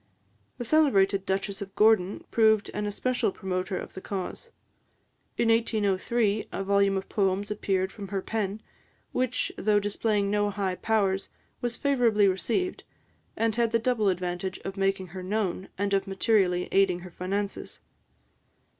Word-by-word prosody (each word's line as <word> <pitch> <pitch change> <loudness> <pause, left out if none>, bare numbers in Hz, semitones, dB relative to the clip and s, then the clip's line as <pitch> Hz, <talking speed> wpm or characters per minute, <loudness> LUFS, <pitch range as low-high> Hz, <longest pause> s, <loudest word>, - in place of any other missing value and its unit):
The 245 - -5
celebrated 200 -10 +3
Duchess 195 +1 -2
of 195 -1 -7
Gordon 210 -3 +3
proved 220 -2 +3
an 210 0 -2
especial 235 +1 0
promoter 185 0 -3
of - - -7
the 190 - -8
cause. 195 - -5 0.9
In 235 - +2
1803, 215 -1 +1
a 195 - -3
volume 200 0 +3
of 190 - -4
poems 200 0 0
appeared 190 -2 0
from 200 -2 -8
her 195 -1 -3
pen, 215 -1 -3 0.5
which, 255 0 0
though 210 0 +3
displaying 205 0 0
no 205 0 +2
high 195 -2 -1
powers, 195 -1 0 0.3
was 240 -1 -2
favourably 235 -7 +3
received, 230 - -1 0.5
and 225 -1 +1
had 235 -1 +2
the 230 - +4
double 230 -3 +1
advantage 180 0 -2
of 195 - -4
making 195 -2 0
her 185 +2 -7
known, 190 -1 -2
and 200 +1 -1
of 195 0 +1
materially 195 -3 +2
aiding 190 -2 +3
her 180 0 -10
finances. 195 +3 -4
200 Hz, 145 wpm, -27 LUFS, 190-220 Hz, 0.9 s, the